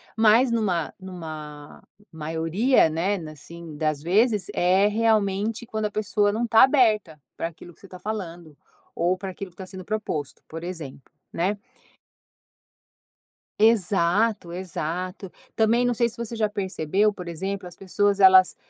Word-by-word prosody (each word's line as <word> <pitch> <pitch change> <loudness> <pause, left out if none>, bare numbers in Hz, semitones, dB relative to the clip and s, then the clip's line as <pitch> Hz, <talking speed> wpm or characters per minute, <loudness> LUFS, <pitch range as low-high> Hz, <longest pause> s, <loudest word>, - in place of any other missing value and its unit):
mas 225 +3 +5
numa 195 -8 0
numa 155 -5 -9 0.3
maioria, 165 - +1
né, 170 +6 0
assim, 160 +1 -11
das 155 -1 -1
vezes 210 +5 +2
é 185 +3 +3
realmente 215 0 +1
quando 220 -1 -3
a 210 - -2
pessoa 205 -1 +1
não 230 +3 -1
tá 225 -1 +6
aberta 215 - +3 0.2
para - - -2
aquilo 170 +1 -13
que - - -24
você 195 - -13
tá 185 -1 -11
falando, 175 -7 -6 0.4
ou 180 +2 +1
para 195 0 -6
aquilo 185 +1 -8
que 170 - -31
tá 190 - -7
sendo 185 0 -9
proposto, 180 -8 -4
por 165 +1 -8
exemplo, 160 -7 -8 0.2
né. 190 +5 0 2.0
Exato 205 -2 +2
exato. 180 +1 -5 0.2
Também 230 +2 +3
não 245 - +2
sei 235 0 +1
se - - -11
você 235 0 -5
já 215 -2 0
percebeu 200 0 0
por 180 -3 -9
exemplo 190 +3 -4
as 175 - -11
pessoas 200 +1 0
elas, 190 -1 +7
190 Hz, 150 wpm, -24 LUFS, 170-215 Hz, 2.0 s, elas